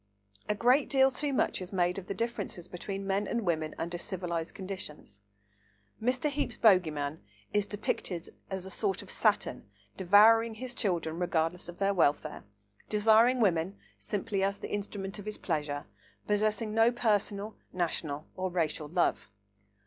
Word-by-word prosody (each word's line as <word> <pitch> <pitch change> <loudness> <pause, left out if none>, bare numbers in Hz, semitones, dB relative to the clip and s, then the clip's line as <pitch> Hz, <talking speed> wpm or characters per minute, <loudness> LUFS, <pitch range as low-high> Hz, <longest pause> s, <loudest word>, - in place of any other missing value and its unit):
A 210 - +2
great 250 +6 +3
deal 270 -1 +5
too 290 +3 -1
much 260 - +1
is 180 - -6
made 180 -1 +1
of 185 - -11
the 200 - -3
differences 205 -5 -3
between 195 +2 -5
men 195 +1 0
and 235 - -1
women 155 -3 -1
under 170 +1 -3
civilised 170 -3 -4
conditions. 185 - -7 0.8
Mr. 250 +5 +1
Heape's 285 -5 -2
bogey 185 -7 +5
man 145 +1 -4 0.3
is 205 -1 +2
depicted 190 -4 -3 0.2
as 190 -1 -3
a 190 - -6
sort 195 -3 -1
of - - -9
Saturn - - +1 0.3
devouring 220 +4 +6
his 250 +2 -4
children, 170 -7 -1
regardless 175 -1 0
of 175 - -9
their 200 0 +2
welfare, 155 -3 +1 0.5
desiring 220 +4 +5
woman 185 -1 +2 0.2
simply 205 -1 -2
as 200 +1 +1
the - - -7
instrument 200 -1 -4
of 205 - -8
his 215 0 -4
pleasure, 150 -4 -2 0.4
possessing 215 +1 0
no 225 +2 +5
personal, 210 -3 0 0.2
national 160 -4 -2
or 185 0 -2
racial 160 -3 -1
love. 175 - 0
195 Hz, 155 wpm, -30 LUFS, 175-215 Hz, 0.8 s, devouring